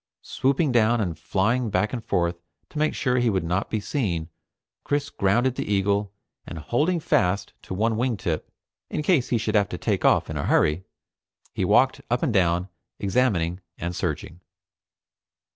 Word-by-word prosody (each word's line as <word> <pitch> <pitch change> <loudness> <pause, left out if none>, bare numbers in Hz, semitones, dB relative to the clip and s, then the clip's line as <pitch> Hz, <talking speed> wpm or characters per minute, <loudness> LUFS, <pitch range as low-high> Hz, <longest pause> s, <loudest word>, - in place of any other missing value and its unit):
Swooping 140 +2 +1
down 120 0 +3
and 90 -6 -1
flying 115 +5 0
back 105 +2 0
and 120 -3 -3
forth 85 -3 0 0.3
to 150 - -5
make 155 0 +1
sure 125 0 +1
he 120 -1 +2
would 95 -4 0
not 90 +4 -1
be 110 - -1
seen, 90 - -2 0.5
Chris 145 -1 -1
grounded 120 +7 +2
the 105 - -4
eagle, 100 0 +1 0.3
and - - -8
holding 145 - 0
fast 95 - +1
to 95 - -6
one 110 +3 +1
wing 120 0 0
tip 85 -4 -3 0.4
in 150 - -2
case 150 -7 +2
he 120 - +2
should 110 -1 -2
have 100 -2 +3
to 90 - -4
take - - -1
off - - +4
in - - -5
a - - -2
hurry, 80 +5 +2 0.7
he - - -1
walked - - +3
up - - 0
and - - +1
down, 90 0 +2 0.3
examining 95 -5 +1 0.2
and 85 +1 -4
searching. 80 -1 -3
105 Hz, 175 wpm, -25 LUFS, 90-125 Hz, 0.7 s, off